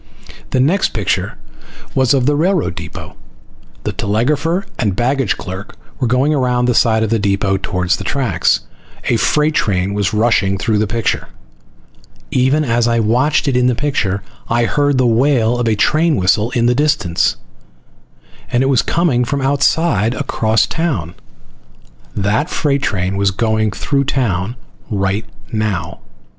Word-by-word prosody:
The 130 - 0
next 170 +9 +2
picture 105 -4 -1 0.6
was 130 +1 +3
of 130 -2 +1
the 145 +2 +2
railroad 175 +2 +1
depot. - - -8 0.7
The - - -2
telegrapher 150 - 0
and 105 -6 0
baggage 130 +1 0
clerk 95 +2 -8 0.2
were 130 - 0
going 130 +5 +2
around 125 -3 +1
the 125 - +2
side 110 -1 +3
of 110 - -2
the 115 - +2
depot 100 -1 +1
towards 90 -1 -1
the - - -6
tracks. 135 +5 +1 0.5
A - - +3
freight 150 +1 +2
train 100 -7 0
was 100 -2 0
rushing 105 -3 +2
through 105 +1 0
the 105 - +1
picture. 115 +2 -1 1.0
Even 135 +4 +2
as 120 -1 +1
I 115 0 +2
watched 125 +8 +1
it 135 - +1
in 125 0 +3
the 125 - +2
picture, 100 -9 -1 0.3
I 120 +1 +2
heard 145 +1 +1
the 130 - +3
wail 120 0 +2
of 120 - 0
a 110 - +2
train 155 +8 +2
whistle 105 +2 +2
in 120 -2 0
the 120 - +3
distance, 140 - +1 1.2
and 120 +2 +2
it 135 - +1
was 130 -4 +3
coming 160 -8 +1
from 140 +4 -2
outside, 135 - +1
across 115 -5 +1
town. 135 - -2 1.0
That 105 - 0
freight 140 -3 0
train 95 -5 -1
was 100 0 +2
going 110 +2 0
through 140 +8 -1
town 115 -6 -1 0.3
right 100 0 -1 0.3
now. 100 -7 -2
120 Hz, 155 wpm, -16 LUFS, 105-140 Hz, 1.2 s, was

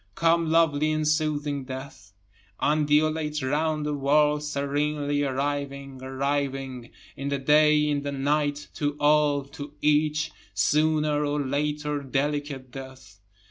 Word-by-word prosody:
Come 165 0 +2
lovely 155 -2 +3
and 155 0 0
soothing 150 -2 0
death, 130 -6 -9 0.5
Undulate 150 0 +1
round 150 +2 0
the 150 - -1
world, 150 +1 +2
serenely 145 0 -1
arriving, 140 -1 -3
arriving, 135 -2 -3 0.3
In 140 +1 -4
the 140 - 0
day, 150 +2 +4
in 145 -1 0
the 140 0 -3
night, 145 +1 -1
to 145 -1 -2
all, 145 -1 +3
to 145 +1 -9
each, 150 +1 +2 0.2
Sooner 150 -1 +2
or 145 0 -1
later 150 +1 -1
delicate 140 -1 -2
death. 130 -6 -11
145 Hz, 120 wpm, -26 LUFS, 140-150 Hz, 0.5 s, day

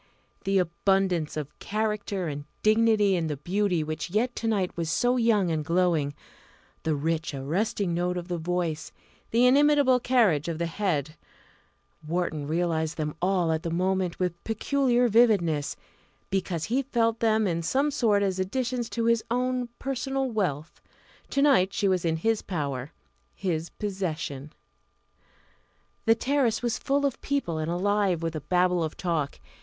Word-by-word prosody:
The 195 0 +2
abundance 180 -2 +1
of 150 -1 -6
character 210 -3 -2
and 145 -1 -5 0.2
dignity 215 -2 +4
in 165 -2 -1
the 150 -2 -3
beauty 180 +2 0
which 155 +1 -4
yet 230 +6 0
to 230 - -2
night 200 -5 0
was 165 -2 -2
so 245 +10 +2
young 220 -7 +2
and 155 -1 -1
glowing 165 -4 +1 0.7
the 160 -1 0
rich 160 +1 -2
arresting 175 +7 -1
note 180 +1 -1
of 175 -1 -5
the 175 -2 -3
voice 170 -2 -2 0.4
the 235 +2 +3
inimitable 280 -1 +5
carriage 220 - +2
of 165 -2 -2
the 170 - -1
head 165 -5 -2 0.9
Wharton 160 -3 -2
realised 160 -1 -1
them 150 -1 -2
all 180 -2 +2
at 160 0 0
the 165 - -3
moment 185 +1 0
with 180 -2 -2
peculiar 245 +2 +1
vividness, 200 -10 +3 0.6
because 185 -4 -1
he 250 +8 +1
felt 230 -4 0
them 220 -1 +2
in 170 -3 0
some 275 - +1
sort 220 -8 +2
as 190 -1 -1
additions 240 +4 -2
to 230 -1 -2
his 230 -1 +3
own 250 0 0
personal 270 0 -2
wealth. 165 -8 -2 0.5
To 275 - +1
night 200 -10 +4
she 205 -1 +1
was 185 -2 +1
in 160 -1 +1
his 225 +6 +1
power, 140 -6 -4 0.4
his 170 -4 -2
possession. 165 -8 -4 1.6
The 225 - +6
terrace 255 -2 +1
was 240 -2 0
full 285 +1 +1
of 275 - -2
people, 270 - -1
and 155 +1 -2
alive 190 -1 +1
with 165 -1 -2
a 155 - -3
Babel 180 +1 +2
of 155 - -4
talk. 165 -6 -1
185 Hz, 155 wpm, -27 LUFS, 165-225 Hz, 1.6 s, The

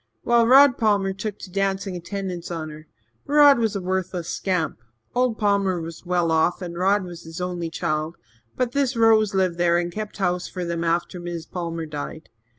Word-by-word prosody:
Well, 235 -1 +4
Rod 270 +1 +7
Palmer 205 -3 +2
took 205 +1 -5
to 185 - -10
dancin' 195 0 -1
attendance 180 0 -5
on 160 -3 -4
her. 155 0 -12 0.4
Rod 290 -2 +6
was 220 -2 0
a 200 - -2
worthless 185 -2 -2
scamp. 180 - -1 0.3
Old 250 -2 +1
Palmer 200 -3 +1
was 165 +1 -8
well 175 -2 +1
off 160 +2 +2
and 175 -3 -6
Rod 195 +3 +2
was 175 -2 -9
his 165 +1 -9
only 175 -2 -3
child, 160 -1 -2 0.4
but 250 -2 0
this 270 -1 0
Rose 220 -3 +4
lived 185 -2 +1
there 170 0 +3
and 175 0 -1
kept 215 +3 -6
house 180 -2 0
for 180 -2 -5
them 170 0 -2
after 170 +2 -1
Mis' 175 -2 -5
Palmer 165 -2 -4
died. 150 +1 -7
180 Hz, 185 wpm, -23 LUFS, 170-205 Hz, 0.4 s, Rod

